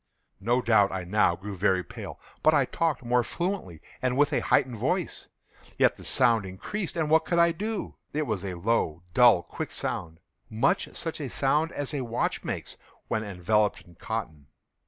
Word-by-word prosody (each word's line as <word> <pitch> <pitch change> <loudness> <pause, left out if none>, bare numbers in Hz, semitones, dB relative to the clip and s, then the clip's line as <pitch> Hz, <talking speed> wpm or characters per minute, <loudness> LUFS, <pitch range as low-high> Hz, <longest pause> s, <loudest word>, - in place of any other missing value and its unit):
No 120 +5 +1
doubt 105 -4 +4
I 95 -1 -3
now 90 -1 +2
grew 100 +3 -7
very 95 -1 +2
pale;—but - - -2
I - - +4
talked 160 -6 -1
more 125 0 +3
fluently, 170 - -4 0.2
and 130 0 0
with 145 0 +3
a - - +3
heightened 125 -3 +2
voice. - - -2 0.5
Yet - - +4
the - - -13
sound 115 -5 +3
increased—and 160 - -3
what 160 0 +5
could 170 - -1
I 170 0 +5
do? 210 +5 -4 0.2
It 150 +1 -1
was 110 -6 -2
a 95 -2 -4
low, 85 -4 0
dull, 120 -8 +6
quick - - -6
sound—much 85 +7 -2
such 165 -1 -3
a 140 - -3
sound 150 +6 +1
as 145 +1 -3
a 140 - -1
watch 120 -1 -1
makes - - -5 0.3
when 110 - 0
enveloped 105 +1 +1
in 85 - -18
cotton. 80 -7 -5
115 Hz, 170 wpm, -27 LUFS, 95-145 Hz, 0.5 s, dull